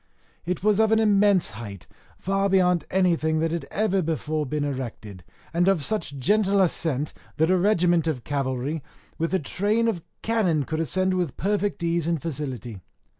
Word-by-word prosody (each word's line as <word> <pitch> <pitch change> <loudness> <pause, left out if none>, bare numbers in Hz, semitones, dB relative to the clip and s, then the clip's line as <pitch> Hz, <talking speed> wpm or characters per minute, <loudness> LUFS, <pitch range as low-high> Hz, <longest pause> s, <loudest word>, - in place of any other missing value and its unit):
It 180 0 -2
was 210 0 +3
of 220 0 +4
an 220 - +5
immense 205 -4 +3
height, 100 -4 -8 0.3
far 195 +1 0
beyond 180 -2 +3
anything 170 -4 +2
that 165 0 0
ever 210 -2 0
had 185 - +1
been 165 - +1
before 150 +1 -3
erected, 130 -10 -4 0.3
and 175 +2 +2
of 190 -6 +3
such 170 -9 -1
gentle 200 +7 +2
ascent, 160 -6 0 0.2
that 160 +3 +3
a 185 - +4
regiment 175 -4 +3
of 135 -7 -2
cavalry 140 +1 -2 0.4
with 165 +1 -1
a 190 - +3
train 210 +9 0
of 200 -7 -1 0.2
cannon 190 -10 +1
could 155 +3 -3
ascend 185 +4 +1
with 180 -7 -2
perfect 205 -1 -1
ease 170 -1 0
and 170 -2 0
facility. 130 - -5
170 Hz, 170 wpm, -25 LUFS, 150-195 Hz, 0.4 s, an